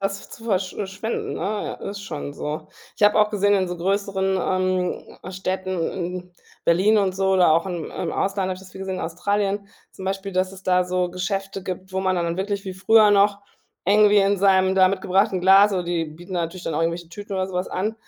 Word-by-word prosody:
das 195 0 -3
zu - - -12
versch 190 -4 0
äh 200 - -4
schwenden, 220 +4 -4
ne, - - -6
ja, 205 +4 -2
ist 200 0 -7
schon 145 -6 -6
so. 150 +2 -5 0.3
Ich - - +3
habe 210 - +5
auch 210 0 +4
gesehen 205 -1 +2
in 190 -2 +1
so 180 - -4
größeren, 190 +1 0 0.9
ähm, 185 - -7
Städten, 185 -2 -2
in 180 0 -5 0.3
Berlin 195 +6 +4
und 190 -2 +1
so 190 0 +1
oder 180 -4 +5
auch 165 +1 +3
im 175 -4 -4
im - - -4
Ausland, 195 -1 -1
habe 185 - -1
ich - - -12
das 190 -1 -14
viel 190 - -10
gesehen, 190 -1 -4
Australien, 200 +4 -1 0.2
zum 190 - -10
Beispiel, 195 +1 -3
dass 185 0 0
es 190 0 -13
da 180 0 +3
so 180 0 -1
Geschäfte 195 +1 -3
gibt, 185 0 -6
wo 190 - -1
man 185 -1 +1
dann 170 -1 0
da 170 +1 -2
wirklich 200 +1 -2
wie 190 -1 -5
früher 210 +2 +5
noch 200 0 +4 0.5
eng 210 +2 +5
wie 210 - +4
in 200 0 +3
seinem 190 -1 +3
da 185 -1 +6
mitgebrachten 190 0 +1
Glas, 195 +3 +6
oder 180 -2 -1
die 170 -1 -1
bieten 165 +4 -11
natürlich 175 +1 -3
dann 165 - -2
irgendwelche 165 +1 -1
Tüten 200 +3 -7
oder 190 0 0
so 190 - -9
was 180 +1 -1
an, 210 +4 -2
190 Hz, 225 wpm, -23 LUFS, 180-200 Hz, 0.9 s, da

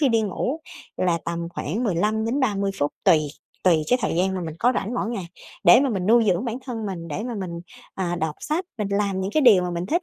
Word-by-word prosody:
khi 285 - +4
đi 225 -2 +2
ngủ 250 - -2 0.4
là 175 -2 +1
tầm 170 0 -3
khoảng 210 - -2
15-30 215 +2 0
phút 145 0 0
tùy, 170 -5 +6 0.4
tùy 165 -4 +4
cái 250 - +4
thời - - 0
gian 190 +2 +1
mà 185 - -2
mình 160 -2 -5
có 245 +5 +3
rảnh 215 +5 -2
mỗi 230 - -1
ngày 195 -7 -4 0.4
để 175 +8 +8
mà 275 - +2
mình 190 -3 -2
nuôi 230 +1 +5
dưỡng 185 +3 +2
bản 240 0 -3
thân 225 -4 -4
mình. 170 -4 -5
Để 185 +9 -4
mà 245 -2 -4
mình, 190 -4 -4 0.4
à, 175 -2 -2
đọc 160 -2 -1
sách, 320 +5 -1
mình 205 -2 -1
làm 200 -1 0
những 190 - -2
cái 310 - +4
điều 205 -8 +7
mà 180 - -2
mình 175 +1 -3
thích, 340 - 0
200 Hz, 245 wpm, -24 LUFS, 175-235 Hz, 0.4 s, để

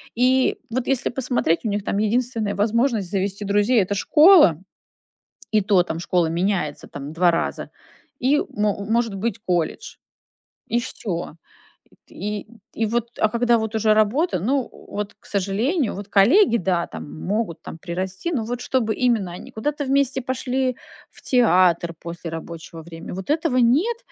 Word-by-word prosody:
И 255 +2 +3
вот 250 +2 -2
если 270 -2 +1
посмотреть, 245 -9 0
у - - +1
них 205 0 -2
там 200 - -2
единственная 220 -1 0
возможность 220 -1 +1
завести 200 +1 -2
друзей- 205 +4 +3
это 190 +2 -1
школа, 300 - +6 0.9
и 215 -1 +3
то, 190 -2 +3
там 165 -2 -5
школа 175 -1 +1
меняется 170 -3 -1
там 145 +2 -8
2 175 +1 +4
раза, 170 - -2 0.5
и 275 +4 +3
мо 205 -1 -1
может 225 -1 0
быть, 205 +2 -2
колледж, 175 -6 -2 0.7
и 235 - +1
всё. 180 -10 -5 0.6
И - - -25
т - - -18
и 205 +2 -4 0.3
и 225 - -1
вот, 235 +2 -1
а 215 - +3
когда 235 +1 +2
вот 220 0 -3
уже 215 0 +3
работа, 215 - +2
ну, 265 +5 +1
э, - - -14 0.2
вот, 205 0 -4
к - - -27
сожалению, 210 - 0
вот 200 +1 -7
коллеги- 235 - +5
да, 180 -3 0
там 80 -2 -8
могут 205 -3 -2
там - - -9
прирасти, 190 - -4
но 245 -7 -1
вот 240 +2 -4
чтобы 240 -4 0
именно 230 -8 +1
они 175 - -10
куда-то 290 +6 -3
вместе 270 -1 +1
пошли 255 0 -1 0.3
в - - -15
театр 180 -8 +3
после 170 0 -7
рабочего 165 0 -8
время- 165 +1 -9
вот 190 +5 -7
этого 310 -3 +1
нет. 290 - +3
215 Hz, 165 wpm, -22 LUFS, 185-250 Hz, 0.9 s, школа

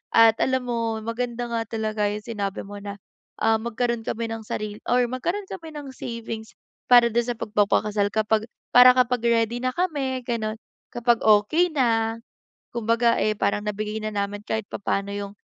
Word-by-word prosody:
At 225 0 +6
alam 260 -1 +1
mo 230 -1 -1
maganda 240 +1 -3
nga 230 -1 -2
talaga 215 -2 -1
yung 210 +1 -4
sinabi 200 -3 -4
mo 205 0 -9
na, 200 0 -7 0.5
ah, 225 0 +4
magkaroon 235 0 -2
kami 230 0 -2
ng 225 - -4
sarili 210 0 -4
or 245 0 +3
magkaroon 345 +11 -2
kami 325 -4 -8
ng 285 -2 -7
savings 230 -3 -7 0.3
para 240 -1 +7
dun 235 +1 +1
sa 245 - -1
pagpapakasal 210 -1 +1
kapag 220 +1 0 0.2
para 250 +1 +8
kapag 250 -1 +2
ready 230 0 +2
na 255 +1 -2
kami 280 -8 -1
ganun, 225 -3 -2 0.4
kapag 240 -1 +2
okey 310 +12 +4
na, 225 -4 +2 0.6
kumbaga 230 +1 +2
eh, 215 - +1
parang 205 0 0
nabigay 210 +1 -3
na 215 - -2
naman 205 0 -3
kahit 220 -1 -3
papaano 200 0 -2
yung, 200 -1 -5
225 Hz, 165 wpm, -24 LUFS, 210-245 Hz, 0.6 s, para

